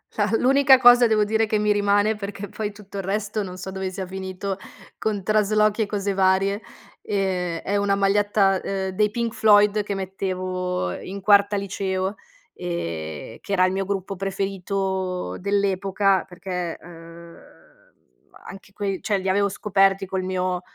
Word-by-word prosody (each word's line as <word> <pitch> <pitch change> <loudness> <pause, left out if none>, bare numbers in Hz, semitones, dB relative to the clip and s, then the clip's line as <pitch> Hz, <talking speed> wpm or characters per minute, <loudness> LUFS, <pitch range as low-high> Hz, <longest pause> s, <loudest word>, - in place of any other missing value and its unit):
la 205 -1 +1
l'unica 270 +1 +5
cosa 245 -1 +7
devo 215 -1 +3
dire 220 +1 +1
che 215 0 0
mi 210 0 +2
rimane, 205 +1 +2
perché 205 0 -6
poi 210 +2 -4
tutto 205 -1 -11
il 195 - -3
resto 210 +2 -2
non 185 -1 -7
so 185 +1 -7
dove 190 0 -3
sia 190 0 -5
finito 190 +1 -5 0.4
con 205 -3 -2
traslochi 215 +1 +2
e - - +2
cose 200 -1 -2
varie, 195 +2 +2 0.4
ehm, 185 -4 -1
è 200 - -2
una 200 0 +2
maglietta, 200 -1 +2
uhm, 190 -1 -2
dei 210 +2 +1
Pink 235 0 -2
Floyd 210 -1 +4
che 205 - -4
mettevo, 185 - -3
ehm, - - -7
in 195 +2 -6
quarta 200 +1 +4
liceo, 195 0 -2 0.4
ehm, 85 - -5
che - - -9
era 185 -1 +4
il 185 - 0
mio 195 - -1
gruppo 195 0 -3
preferito 195 -1 -3
dell'epoca 195 0 +1
perché, 180 -2 -5
ehm, 170 0 -13 1.1
anche 195 0 -11
quei 195 -2 -3
cioè 210 -2 0
li 190 0 -4
avevo 200 +1 +2
scoperti 195 -1 +2
col 190 0 -3
mio 185 -1 -1
195 Hz, 160 wpm, -23 LUFS, 185-205 Hz, 1.1 s, cosa